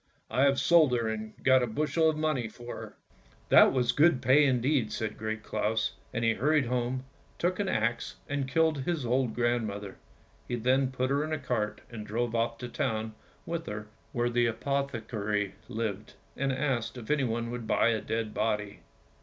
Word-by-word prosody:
" - - -32
I 130 - +3
have 140 -1 +3
sold 160 -6 +5
her 115 -2 +1
and 110 0 -4
got 130 -1 +5
a 125 - +1
bushel 155 +7 +1
of 155 - -1
money 155 -7 0
for 120 +2 -8
her! - - -9 0.3
" 60 0 -30
"That - - +8
was 125 -2 +2
good 145 +1 +4
Jpay 135 +3 +5
indeed!" 130 -2 +1
[said 110 -2 -3
Great 110 0 -4
Claus, 105 0 -1 0.2
and 115 0 -1
he 115 - +4
hurried 150 +4 +2
home, 125 +1 -1 0.3
took 180 +2 0
an 200 -2 0
axe 115 +2 -1
and 145 -2 -2
killed 160 +1 +2
his 150 0 -2
old 125 -1 +1
grand 120 -1 +1
mother. 100 -1 -7 0.5
He 120 - -1
then 130 +3 +2
put 130 0 -1
her 140 +1 +2
in 155 - -4
a 155 - 0
cart 120 -6 -2
and 110 -2 -6
drove 115 +2 -2
off 115 0 0
to 125 - -6
the - - -15
town 110 -6 -1 0.3
with 170 0 -4
her 105 0 -6 0.2
where 120 0 0
the 120 0 +3
apothecary 110 -6 -2 0.2
lived, 110 -3 -4 0.2
and 135 0 0
asked 130 -3 -1
if 115 -3 -8
he 150 -2 +2
would 115 -1 -3
buy 115 - +3
a 110 -2 0
dead 110 -1 -3
body. 105 -2 -1
120 Hz, 195 wpm, -29 LUFS, 110-135 Hz, 0.5 s, That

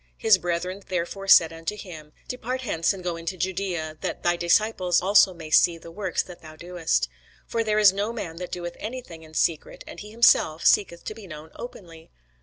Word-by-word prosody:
His 220 -4 +4
brethren 180 +2 -3
therefore 185 +2 -3
said 165 -4 +7
unto 165 +6 -5
him, 160 -6 -10 0.2
Depart 250 +1 -4
hence, 165 -9 0
and 190 -2 -7
go 175 -1 -2
into 170 +2 -5
Judæa, 175 -3 -3
that - - -4
thy 175 0 +2
disciples 180 +1 +2
also 195 +1 +5
may 165 -3 -10
see 170 +1 +5
the 165 0 -12
works 185 -1 -2
that 180 -2 -13
thou 155 -1 -12
doest. 165 - -1 0.4
For 230 -1 -1
there 215 -1 0
is 205 -3 +6
no 205 +3 -2
man 180 -8 -6
that 180 0 -6
doeth 175 -1 -5
any 250 +4 -5
thing 165 -5 -12
in 155 0 -15
secret, 160 -1 -1
and - - -10
he 210 - -9
himself 210 -8 +3
seeketh 170 -4 +3
to - - -5
be 215 -2 -12
known 155 -1 -10
openly. 165 -9 -11
180 Hz, 205 wpm, -25 LUFS, 165-205 Hz, 0.4 s, said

